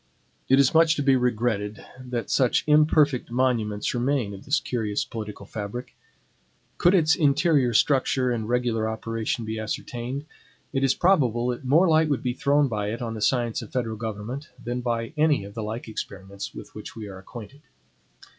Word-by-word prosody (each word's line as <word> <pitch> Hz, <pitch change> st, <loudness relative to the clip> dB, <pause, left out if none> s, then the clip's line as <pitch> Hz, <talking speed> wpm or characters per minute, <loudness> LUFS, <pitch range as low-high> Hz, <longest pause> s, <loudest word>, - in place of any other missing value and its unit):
It 135 Hz, -, +6 dB
is 135 Hz, -1 st, +4 dB
much 165 Hz, 0 st, +5 dB
to 145 Hz, -, -1 dB
be 135 Hz, -1 st, +4 dB
regretted 115 Hz, -4 st, -1 dB
that 125 Hz, -2 st, -4 dB
such 130 Hz, -3 st, +3 dB
imperfect 150 Hz, -3 st, +3 dB
monuments 115 Hz, -4 st, 0 dB
remain 120 Hz, -4 st, 0 dB
of 95 Hz, -, -11 dB
this 140 Hz, +2 st, +2 dB
curious 110 Hz, -4 st, -2 dB
political 105 Hz, -2 st, -7 dB
fabric. 110 Hz, +5 st, -6 dB, 0.8 s
Could 175 Hz, +3 st, +5 dB
its 160 Hz, -3 st, +4 dB
interior 145 Hz, -4 st, +3 dB
structure 130 Hz, 0 st, +2 dB
and 110 Hz, -2 st, -2 dB
regular 120 Hz, -3 st, 0 dB
operation 115 Hz, +1 st, -3 dB
be 110 Hz, 0 st, -4 dB
ascertained, 120 Hz, +5 st, -4 dB, 0.5 s
it 135 Hz, -1 st, 0 dB
is 135 Hz, -, +3 dB
probable 125 Hz, -, +2 dB
that 125 Hz, +1 st, -4 dB
more 160 Hz, +8 st, +5 dB
light 160 Hz, -1 st, +4 dB
would 145 Hz, -, 0 dB
be 125 Hz, -1 st, 0 dB
thrown 140 Hz, +2 st, +2 dB
by 105 Hz, -4 st, -2 dB
it 115 Hz, +3 st, -4 dB
on 115 Hz, -1 st, -3 dB
the 110 Hz, -, -6 dB
science 120 Hz, -1 st, +1 dB
of -, -, -10 dB
federal 115 Hz, -3 st, -2 dB
government, 110 Hz, +6 st, -5 dB
than 120 Hz, +1 st, -3 dB
by 115 Hz, +1 st, -2 dB
any 150 Hz, -7 st, +3 dB
of 100 Hz, -, -10 dB
the 115 Hz, -, -5 dB
like 110 Hz, +3 st, -5 dB
experiments 100 Hz, -2 st, -7 dB
with -, -, -11 dB
which -, -, -9 dB
we 110 Hz, -2 st, -7 dB
are 95 Hz, -1 st, -9 dB
acquainted. 120 Hz, +7 st, -11 dB
120 Hz, 175 wpm, -25 LUFS, 110-140 Hz, 0.8 s, It